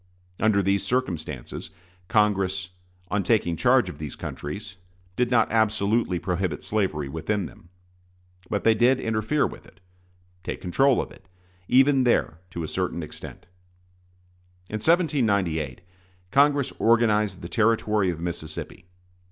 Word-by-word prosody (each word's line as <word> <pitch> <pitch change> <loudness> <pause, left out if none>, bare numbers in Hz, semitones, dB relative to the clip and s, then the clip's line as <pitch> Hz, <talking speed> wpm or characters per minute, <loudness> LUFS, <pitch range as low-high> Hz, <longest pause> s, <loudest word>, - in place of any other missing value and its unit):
Under 105 -2 +3
these 100 +1 +1
circumstances, 80 - -3 0.4
Congress, 95 -4 +1 0.4
on 105 - +1
taking 90 -3 +1
charge - - +3
of - - -8
these 75 -4 -6
countries, 90 +5 -7 0.4
did 125 -1 +1
not 115 -3 +3
absolutely 110 -2 +1
prohibit 90 0 -2
slavery 95 -9 -1
within 90 +7 -2
them. 80 +4 -13 0.8
But 105 - -1
they 115 - +5
did 120 +4 +3
interfere 110 +6 0
with - - -8
it 90 - -21 0.6
take - - -4
control 130 +9 +2
of - - -12
it 95 - -17 0.4
even 135 +1 +5
there, 115 -9 +1
to 85 -2 -5
a - - -3
certain 90 0 -2
extent. 75 - -10 1.3
In 110 - -2
1798 100 - +1 0.5
Congress 140 0 +3
organized 105 -5 +2
the - - -4
Territory 110 -2 +2
of 85 -2 -3
Mississippi. 85 +1 -6
100 Hz, 125 wpm, -25 LUFS, 85-115 Hz, 1.3 s, they